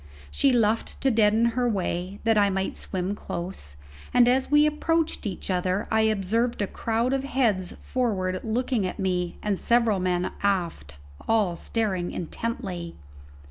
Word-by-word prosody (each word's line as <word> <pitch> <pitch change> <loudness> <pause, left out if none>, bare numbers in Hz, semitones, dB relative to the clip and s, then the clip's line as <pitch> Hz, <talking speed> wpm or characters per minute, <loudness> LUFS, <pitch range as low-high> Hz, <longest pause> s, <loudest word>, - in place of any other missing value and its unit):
She 275 - +3
luffed 225 -2 +1
to 270 - +3
deaden 220 +1 +4
her 245 +1 0
way, 185 -2 -2
that 225 -1 +3
I 205 -1 +4
might 190 0 -2
swim 185 +1 -2
close, 170 - -6 0.4
and 245 -1 +6
as 260 +2 +2
we 295 +1 +5
approached 315 -2 0
each 190 0 -5
other 185 +2 0
I 220 0 +3
observed 220 +3 +1
a - - +1
crowd 230 +5 -1
of 270 0 0
heads 230 -9 0
forward 190 -7 -1
looking 235 -2 0
at - - -6
me, 180 -3 -1
and 205 -3 0
several 235 -4 +2
men 180 0 0
aft, 170 - -1 0.3
all 210 -6 +2
staring 190 -4 -2
intently. 180 -2 -4
210 Hz, 150 wpm, -26 LUFS, 185-235 Hz, 0.4 s, and